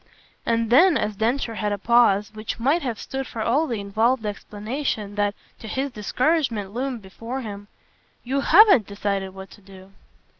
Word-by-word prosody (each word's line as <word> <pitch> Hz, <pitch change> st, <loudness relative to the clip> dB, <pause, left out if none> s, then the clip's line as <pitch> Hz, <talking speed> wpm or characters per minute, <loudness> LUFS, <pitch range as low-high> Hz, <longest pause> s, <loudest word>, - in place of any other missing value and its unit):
And 230 Hz, -1 st, +1 dB
then 335 Hz, +7 st, +6 dB
as 210 Hz, -1 st, -2 dB
Densher 230 Hz, +3 st, -1 dB
had 210 Hz, -1 st, -2 dB
a 205 Hz, -, -1 dB
pause 210 Hz, -2 st, +3 dB
which 215 Hz, +1 st, -5 dB
might 280 Hz, +9 st, +2 dB
have 245 Hz, -6 st, -3 dB
stood 270 Hz, +3 st, -5 dB
for 220 Hz, -, -4 dB
all 280 Hz, +8 st, +2 dB
the 230 Hz, -5 st, -3 dB
involved 220 Hz, +4 st, 0 dB
explanation 210 Hz, +1 st, -4 dB
that, 205 Hz, 0 st, 0 dB, 0.2 s
to 220 Hz, -, -9 dB
his 265 Hz, +5 st, -2 dB
discouragement, 235 Hz, -2 st, -1 dB
loomed 250 Hz, -2 st, -3 dB
before 230 Hz, +7 st, -6 dB
him: 205 Hz, -3 st, -8 dB, 0.6 s
"You 265 Hz, +3 st, -1 dB
HAVEN'T 360 Hz, -, +6 dB
decided 200 Hz, -2 st, -3 dB
what 190 Hz, 0 st, -10 dB
to 205 Hz, -, -16 dB
do." 190 Hz, 0 st, -15 dB
225 Hz, 165 wpm, -23 LUFS, 205-260 Hz, 0.6 s, then